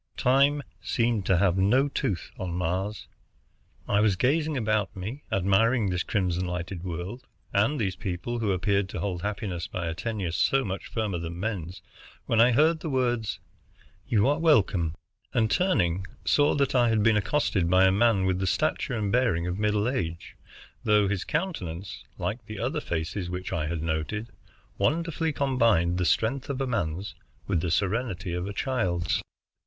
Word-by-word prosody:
Time 140 +3 +3 0.2
seemed 115 -4 0
to 95 - +4
have 95 0 +2
no 125 +9 +4
tooth 100 - -2
on 90 -2 -3
Mars. 95 +4 -2 0.8
I 100 - +2
was 105 -3 +3
gazing 150 - +1
about 110 -4 0
me, 105 +10 -5
admiring 100 +3 +2
this 90 0 0
crimson 90 -2 -1
lighted 90 0 -4
world, 90 +7 -6 0.3
and 110 +9 +2
these 95 -3 -1
people 95 +6 -4
who 110 -3 0
appeared 100 +1 +1
to 90 - -5
hold 90 -1 -2
happiness 100 -3 -3
by 90 - -4
a 80 - -2
tenure 100 -2 -3
so 135 +10 +2
much 95 -1 -4
firmer 105 -6 -2
than 85 +1 -6
men's, 95 -4 -4 0.4
when 115 -1 +3
I 120 +2 +6
heard 155 +6 +4
the 160 - -4
words, 120 -5 0 0.7
"You 105 +1 +3
are 145 +3 +2
welcome," 100 - +3 0.4
and, 110 -3 +2
turning, 95 - +1 0.2
saw 145 0 +3
that 140 -2 +1
I 120 -2 +4
had 110 -2 +2
been 115 0 +4
accosted 105 - +1
by 95 +1 +5
a 95 - +5
man 105 -1 +3
with 95 -1 +1
the 95 - -1
stature 125 +5 0
and 105 -2 -1
bearing 115 -8 +2
of 90 +2 -3
middle 105 0 +1
age, 85 -8 -3 0.5
though 105 -1 +4
his 95 -2 -1
countenance, 95 - -4
like 115 +3 -4
the 110 -1 -7
other 135 +8 -1
faces 85 - -3
which 90 +1 -4
I 75 -2 -1
had 80 -1 -3
noted, 80 +8 -2 0.5
wonderfully 165 0 0
combined 115 - +2
the 90 - +1
strength 125 +10 +1
of 140 -1 -2
a 135 - 0
man's 95 -6 -2 0.3
with 90 -5 0
the 90 - -1
serenity 100 -1 -1
of 90 +2 -2
a 100 - -5
child's. 95 -9 0
100 Hz, 170 wpm, -27 LUFS, 90-120 Hz, 0.8 s, I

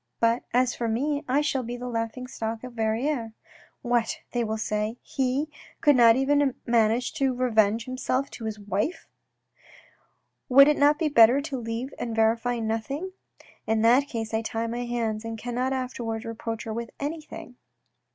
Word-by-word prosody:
But 230 +1 +2
as 250 0 +2
for 235 - -3
me, 285 +6 -1
I 270 +3 +2
shall 285 -3 0
be 240 0 -5
the 250 +1 -6
laughing 230 +1 -3
stock 225 -2 -5
of 250 -1 -8
Verrieres. 225 +2 -1 0.3
' - - -32
What,' 240 -2 +1
they 240 -1 0
will 220 0 -2
say, 215 +1 -2
' - - -50 0.2
he 265 +3 +1 0.3
could 290 -2 +5
not 230 -2 +7
even 275 0 +2
manage 235 +1 +2
to 270 -4 0
revenge 225 -3 +2
himself 255 +1 -1
on 225 - -6
his 215 -1 -4
wife! 205 - -3 0.7
' - - -32
Would 275 +2 +8
it 300 - +3
not 290 +1 +5
be 315 - +1
better 245 -2 +6
to 285 -1 -5
leave 230 +3 -4
it - - -16
and 230 -2 -3
verify 230 +2 +2
nothing? 230 +11 -3 0.6
In 220 0 +1
that 250 +5 +5
case 225 -4 -5
I 220 - +1
tie 225 0 -3
my 240 +1 -3
hands, 230 -2 -2
and 225 0 -5
cannot 245 +3 -2
afterwards 240 -4 -3
reproach 225 0 -5
her 220 - -5
with 235 +1 -4
anything." 295 -4 -6
240 Hz, 180 wpm, -26 LUFS, 225-265 Hz, 0.7 s, Would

